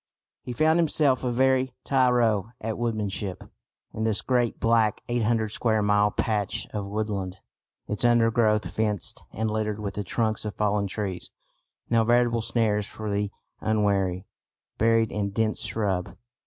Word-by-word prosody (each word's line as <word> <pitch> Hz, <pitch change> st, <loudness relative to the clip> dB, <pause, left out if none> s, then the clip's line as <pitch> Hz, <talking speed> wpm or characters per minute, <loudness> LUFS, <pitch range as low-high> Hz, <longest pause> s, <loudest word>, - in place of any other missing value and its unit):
He -, -, -7 dB
found 155 Hz, +6 st, +3 dB
himself 145 Hz, -5 st, +2 dB
a 125 Hz, -, 0 dB
very 130 Hz, +1 st, +2 dB
tyro 120 Hz, -5 st, +2 dB
at 110 Hz, 0 st, -4 dB
woodmanship 105 Hz, -5 st, -3 dB, 0.5 s
in 110 Hz, -, -3 dB
this 110 Hz, -2 st, +1 dB
great 120 Hz, -3 st, 0 dB
black 115 Hz, -2 st, +2 dB
eight 120 Hz, 0 st, 0 dB
hundred 110 Hz, -1 st, +1 dB
square 110 Hz, 0 st, +1 dB
mile 105 Hz, 0 st, +3 dB
patch 105 Hz, -2 st, -1 dB
of 105 Hz, -2 st, -3 dB
woodland, 100 Hz, -3 st, -3 dB, 0.5 s
its 105 Hz, -, -3 dB
undergrowth 115 Hz, -4 st, +3 dB
fenced 105 Hz, 0 st, -1 dB
and 110 Hz, +1 st, -2 dB
littered 105 Hz, -1 st, -2 dB
with 100 Hz, -2 st, -4 dB
the 105 Hz, -, -3 dB
trunks 110 Hz, +3 st, -1 dB
of 105 Hz, -1 st, -5 dB
fallen 105 Hz, -1 st, +1 dB
trees, 95 Hz, -2 st, -4 dB, 0.6 s
now 115 Hz, -1 st, +3 dB
veritable 120 Hz, 0 st, +3 dB
snares 110 Hz, -2 st, 0 dB
for 110 Hz, -1 st, -5 dB
the 100 Hz, 0 st, 0 dB, 0.3 s
unwary, 100 Hz, -4 st, 0 dB, 0.5 s
buried 115 Hz, 0 st, +3 dB
in 100 Hz, -1 st, -1 dB
dense 110 Hz, +1 st, -1 dB
shrub. 95 Hz, -5 st, -2 dB
110 Hz, 145 wpm, -26 LUFS, 105-115 Hz, 0.6 s, found